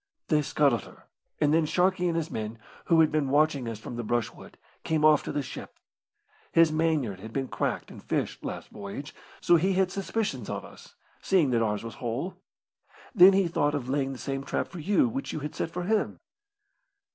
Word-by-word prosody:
"They 155 Hz, -2 st, +4 dB
scuttled 140 Hz, -5 st, +1 dB
her, -, -, -16 dB, 0.4 s
and 150 Hz, -1 st, +3 dB
then 160 Hz, -1 st, +3 dB
Sharkey 180 Hz, +2 st, +2 dB
and 170 Hz, -1 st, 0 dB
his 165 Hz, -1 st, -2 dB
men, 110 Hz, +1 st, -4 dB, 0.3 s
who 165 Hz, -1 st, +5 dB
had 155 Hz, -, +4 dB
been 150 Hz, -3 st, 0 dB
watching 145 Hz, -3 st, +2 dB
us 115 Hz, -1 st, -4 dB
from 115 Hz, +2 st, -8 dB
the 120 Hz, -, -3 dB
brushwood, 115 Hz, 0 st, -3 dB, 0.3 s
came 155 Hz, -1 st, +1 dB
off 155 Hz, -2 st, +6 dB
to -, -, -3 dB
the 145 Hz, 0 st, -1 dB
ship. 130 Hz, -, -8 dB, 0.8 s
His 165 Hz, -1 st, +5 dB
mainyard 155 Hz, -, 0 dB
had 110 Hz, +3 st, -9 dB
been 135 Hz, +2 st, -2 dB
cracked -, -, -2 dB
and -, -, -11 dB
fished -, -, -2 dB
last -, -, -6 dB
voyage, 105 Hz, +8 st, -7 dB, 0.3 s
so 175 Hz, -, +5 dB
he 190 Hz, +4 st, +1 dB
had 185 Hz, -1 st, +2 dB
suspicions 195 Hz, -, -2 dB
of -, -, -4 dB
us, -, -, -15 dB, 0.3 s
seeing 175 Hz, -9 st, +3 dB
that 115 Hz, -1 st, +2 dB
ours 105 Hz, -2 st, 0 dB
was 115 Hz, -1 st, -6 dB
whole. 125 Hz, +10 st, -2 dB, 0.8 s
Then 195 Hz, -3 st, +8 dB
he 190 Hz, -2 st, +3 dB
thought 145 Hz, -3 st, +1 dB
of 130 Hz, -3 st, -4 dB
laying 135 Hz, 0 st, 0 dB
the 135 Hz, -, -6 dB
same 135 Hz, +1 st, -4 dB
trap -, -, -2 dB
for 180 Hz, -, -8 dB
you 205 Hz, -, +3 dB
which 270 Hz, +3 st, -4 dB
you 155 Hz, -, -4 dB
had 150 Hz, +1 st, -5 dB
set -, -, -3 dB
for 180 Hz, +2 st, -4 dB
him." 215 Hz, +3 st, 0 dB
150 Hz, 205 wpm, -28 LUFS, 125-175 Hz, 0.8 s, Then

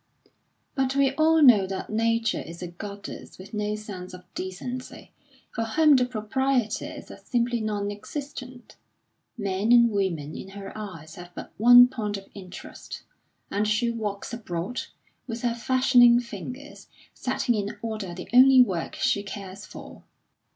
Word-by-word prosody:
But 265 Hz, -1 st, 0 dB
we 275 Hz, -1 st, +3 dB
all 315 Hz, +2 st, +4 dB
know 215 Hz, -8 st, +7 dB
that 190 Hz, +2 st, -5 dB
Nature 230 Hz, 0 st, +1 dB
is 170 Hz, +2 st, -9 dB
a -, -, -4 dB
goddess 200 Hz, +3 st, -9 dB
with 190 Hz, +3 st, -12 dB
no 210 Hz, 0 st, -1 dB
sense 190 Hz, -4 st, -8 dB
of 180 Hz, -, -13 dB
decency, 245 Hz, +8 st, -6 dB, 0.4 s
for 225 Hz, -, -2 dB
whom 300 Hz, +6 st, +4 dB
the 250 Hz, -1 st, +3 dB
proprieties 250 Hz, 0 st, -2 dB
are -, -, -10 dB
simply 240 Hz, -1 st, 0 dB
non 205 Hz, -1 st, -2 dB
existent; 255 Hz, +2 st, -8 dB, 0.6 s
men 200 Hz, +1 st, -1 dB
and 235 Hz, -1 st, +6 dB
women 170 Hz, -7 st, -2 dB
in 190 Hz, -, -8 dB
her 195 Hz, +1 st, -8 dB
eyes 175 Hz, -7 st, -8 dB
have 175 Hz, 0 st, -9 dB
but -, -, -8 dB
one 245 Hz, +2 st, +9 dB
point 215 Hz, -5 st, -3 dB
of 195 Hz, -, -10 dB
interest, 185 Hz, -2 st, -10 dB, 0.5 s
and 205 Hz, +2 st, 0 dB
she 225 Hz, +3 st, +1 dB
walks 215 Hz, -1 st, -4 dB
abroad, 205 Hz, 0 st, -4 dB, 0.5 s
with 230 Hz, 0 st, -5 dB
her 240 Hz, -1 st, +1 dB
fashioning 245 Hz, 0 st, +5 dB
fingers, 250 Hz, +5 st, -8 dB, 0.3 s
setting 240 Hz, -, -1 dB
in 210 Hz, 0 st, -3 dB
order 215 Hz, -6 st, -4 dB
the 180 Hz, -, -8 dB
only 260 Hz, +1 st, +8 dB
work 180 Hz, -8 st, -3 dB
she 200 Hz, -, +1 dB
cares 200 Hz, -1 st, -8 dB
for. -, -, -11 dB
215 Hz, 150 wpm, -26 LUFS, 195-245 Hz, 0.6 s, one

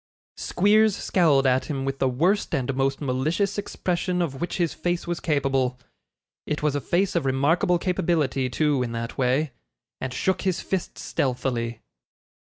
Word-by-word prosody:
Squeers 210 Hz, +2 st, +3 dB
scowled 155 Hz, -10 st, +3 dB
at 130 Hz, 0 st, +3 dB
him 135 Hz, -3 st, -3 dB
with 135 Hz, 0 st, -3 dB
the 135 Hz, -, +2 dB
worst 175 Hz, +11 st, +1 dB
and 135 Hz, 0 st, -1 dB
most 135 Hz, +1 st, 0 dB
malicious 150 Hz, +10 st, 0 dB
expression 180 Hz, -2 st, -2 dB
of 140 Hz, -6 st, -2 dB
which 175 Hz, -, -2 dB
his 170 Hz, -3 st, 0 dB
face 175 Hz, 0 st, -2 dB
was 175 Hz, 0 st, -2 dB
capable 135 Hz, -4 st, 0 dB, 0.7 s
it 150 Hz, 0 st, -2 dB
was 150 Hz, -2 st, +2 dB
a 145 Hz, -, -1 dB
face 180 Hz, +7 st, 0 dB
of 170 Hz, -, +2 dB
remarkable 145 Hz, +7 st, +2 dB
capability, 165 Hz, -8 st, 0 dB
too, 145 Hz, +1 st, +1 dB
in 120 Hz, -2 st, -2 dB
that 115 Hz, +2 st, -5 dB
way 135 Hz, +3 st, +1 dB, 0.5 s
and 130 Hz, -, -4 dB
shook 185 Hz, +8 st, 0 dB
his 185 Hz, -2 st, 0 dB
fist 190 Hz, -2 st, -3 dB
stealthily. 120 Hz, -3 st, -2 dB
145 Hz, 160 wpm, -25 LUFS, 130-175 Hz, 0.7 s, Squeers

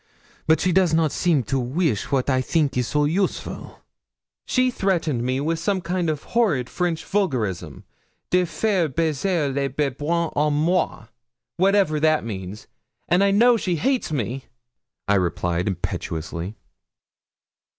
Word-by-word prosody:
But 160 Hz, 0 st, +4 dB
she 185 Hz, -, +1 dB
does 180 Hz, -3 st, +3 dB
not 160 Hz, -2 st, +2 dB
seem 160 Hz, -6 st, +1 dB
to 130 Hz, +4 st, -1 dB
weesh 130 Hz, -, -1 dB
wat 135 Hz, -2 st, +1 dB
I 130 Hz, -2 st, +2 dB
think 145 Hz, 0 st, 0 dB
is 125 Hz, -1 st, 0 dB
so 150 Hz, 0 st, +1 dB
useful.' 185 Hz, +6 st, -2 dB, 0.7 s
'She 255 Hz, 0 st, +2 dB
threatened 170 Hz, -, 0 dB
me 130 Hz, +2 st, -1 dB
with 160 Hz, +3 st, -1 dB
some 200 Hz, -2 st, 0 dB
horrid 170 Hz, -, 0 dB
French 175 Hz, -3 st, -2 dB
vulgarism 125 Hz, -, -2 dB, 0.5 s
de 180 Hz, 0 st, +3 dB
faire 185 Hz, -2 st, 0 dB
baiser 160 Hz, +1 st, 0 dB
le 140 Hz, 0 st, 0 dB
babouin 150 Hz, +5 st, -1 dB
à 150 Hz, +1 st, +1 dB
moi, 155 Hz, -4 st, 0 dB, 0.5 s
whatever 190 Hz, -4 st, +3 dB
that 155 Hz, -4 st, +2 dB
means; 100 Hz, -1 st, -6 dB, 0.4 s
and 180 Hz, +3 st, +3 dB
I 200 Hz, -, +4 dB
know 235 Hz, +4 st, +5 dB
she 185 Hz, -5 st, -1 dB
hates 260 Hz, -, 0 dB
me,' 130 Hz, -1 st, -3 dB, 0.6 s
I 100 Hz, -, +3 dB
replied, 90 Hz, -1 st, 0 dB
impetuously. 85 Hz, 0 st, -4 dB
155 Hz, 135 wpm, -23 LUFS, 125-180 Hz, 0.7 s, know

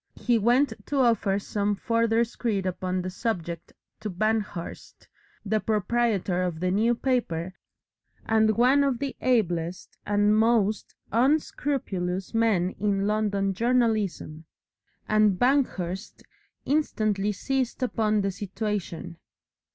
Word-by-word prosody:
He 240 Hz, -2 st, +1 dB
went 240 Hz, +4 st, +3 dB
to 290 Hz, -, -2 dB
offer 230 Hz, -6 st, +2 dB
some 205 Hz, 0 st, -1 dB
further 230 Hz, +2 st, +1 dB
screed 225 Hz, -4 st, -2 dB
upon 185 Hz, 0 st, -2 dB
the 185 Hz, -, -4 dB
subject 175 Hz, -6 st, -4 dB, 0.3 s
to 215 Hz, -, -4 dB
Banghurst, 210 Hz, -2 st, -3 dB, 0.4 s
the 215 Hz, +1 st, +1 dB
proprietor 210 Hz, -3 st, 0 dB
of 175 Hz, -3 st, -2 dB
the 180 Hz, +1 st, 0 dB
New 225 Hz, +5 st, +2 dB
Paper, 190 Hz, -10 st, -1 dB, 0.7 s
and 220 Hz, -1 st, +2 dB
one 260 Hz, +4 st, +5 dB
of 275 Hz, -3 st, +1 dB
the 275 Hz, +1 st, -4 dB
ablest 180 Hz, -8 st, -1 dB
and 205 Hz, +1 st, +3 dB
most 220 Hz, -2 st, +1 dB, 0.2 s
unscrupulous 230 Hz, -, 0 dB
men 215 Hz, -6 st, +2 dB
in 200 Hz, -1 st, 0 dB
London 200 Hz, -2 st, 0 dB
journalism, 215 Hz, -8 st, 0 dB, 0.6 s
and 215 Hz, -3 st, +3 dB
Banghurst 210 Hz, -8 st, 0 dB, 0.4 s
instantly 215 Hz, -9 st, 0 dB
seized 260 Hz, +4 st, -2 dB
upon 215 Hz, -4 st, +1 dB
the 195 Hz, 0 st, -1 dB
situation. 190 Hz, -4 st, -4 dB
215 Hz, 110 wpm, -26 LUFS, 190-235 Hz, 0.7 s, one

